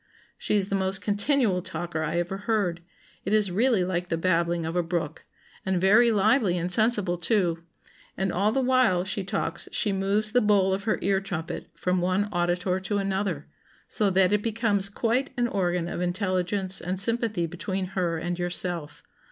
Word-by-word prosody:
She - - -1
is 200 -1 +1
the 195 - 0
most 190 0 0
continual 205 -2 +1
talker 175 -2 -5
I 160 +2 -2
ever 175 +3 -2
heard; 200 -5 -1 0.4
it 195 - -2
is 210 -3 +3
really 220 0 +2
like 180 -1 -2
the 165 - 0
babbling 170 -1 0
of 165 +2 -4
a 175 - +2
brook; 165 -2 -4 0.4
and 190 -1 0
very 220 +6 +5
lively 205 -2 +2
and 175 +1 -2
sensible 205 -4 +3
too; 175 -3 0 0.5
and 190 -1 -1
all 200 +4 +1
the 265 +3 0
while 250 -8 +3
she 190 +1 -1
talks 190 - -3
she 210 - 0
moves 200 +3 +1
the 245 +2 +3
bowl 200 -2 +3
of 195 +1 -3
her 220 - +1
ear 195 -1 +1
trumpet 175 -4 -5
from 180 0 -1
one 185 +3 0
auditor 180 +1 0
to 190 +2 -2
another, 195 -5 -2 0.4
so 210 -2 +1
that 190 +1 +3
it 210 - +2
becomes 210 -3 0
quite 235 +6 0
an 240 0 +1
organ 180 -5 -1
of 175 - -4
intelligence 185 +1 0
and 185 +2 -2
sympathy 220 -3 +2
between 185 +3 -4
her 175 -3 -1
and 175 +2 -4
yourself.... 175 -3 -3
190 Hz, 180 wpm, -26 LUFS, 175-210 Hz, 0.5 s, very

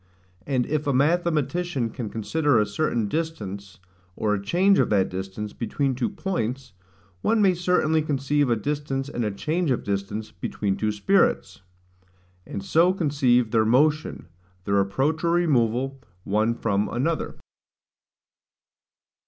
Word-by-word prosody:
And 130 -3 +1
if 150 0 -2
a 140 - +2
mathematician 160 -2 +1
can 115 -4 -5
consider 145 +6 +1
a 105 - +3
certain 115 0 -1
distance, 100 - -4 0.4
or 105 -1 0
a 100 - -1
change 190 - +3
of - - +2
that 100 -3 +2
distance 95 +3 -5
between 135 +3 -1
two 125 -1 -1
points, 130 - -3 0.5
one 225 0 +2
may 195 -3 +4
certainly 175 -3 +1
conceive 145 -1 0
a 120 - +3
distance 140 +3 -3
and 120 -4 -3
a 105 - 0
change 155 - -1
of 125 - 0
distance, 105 +2 -3
between 100 -2 -3
two 110 +1 -1
spirits; 100 -2 +1 0.9
and 100 - -6
so 175 +3 +4
conceive 130 - +2
their 110 -2 +3
motion, 150 +6 +1 0.4
their 100 0 +2
approach 135 - 0
or 170 0 +2
removal, 135 -5 +1 0.2
one 110 +3 +1
from 105 -3 0
another. 160 +7 -2
130 Hz, 135 wpm, -24 LUFS, 105-155 Hz, 0.9 s, may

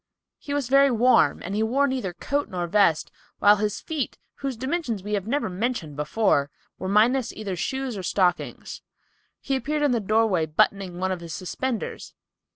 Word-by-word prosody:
He 285 -2 -4
was 285 -4 -1
very 275 +2 +5
warm 250 +1 +3
and 190 - -5
he 210 - 0
wore 255 +6 +2
neither 255 -9 -2
coat 285 +10 -2
nor 175 -2 -2
vest, 170 -3 +2 0.3
while 205 +1 +6
his 210 0 -1
feet, 305 -6 -4 0.2
whose 270 -4 -4
dimensions 260 - -2
we 210 +1 -4
have 200 -1 -1
mentioned 225 - -2
before, 150 -1 +1 0.3
were 185 - -4
minus 230 +5 +3
either 200 -3 -4
shoes 265 +7 -3
or 195 - -4
stockings. 180 0 -1 0.6
He 270 - -1
appeared 295 +3 -1
in 290 - +3
the 240 - +2
doorway 210 -5 +2
buttoning 180 +3 +1
one 190 +1 -1
of 185 - -2
his 170 -2 -7
suspenders. 235 +6 -4
215 Hz, 170 wpm, -25 LUFS, 185-265 Hz, 0.6 s, while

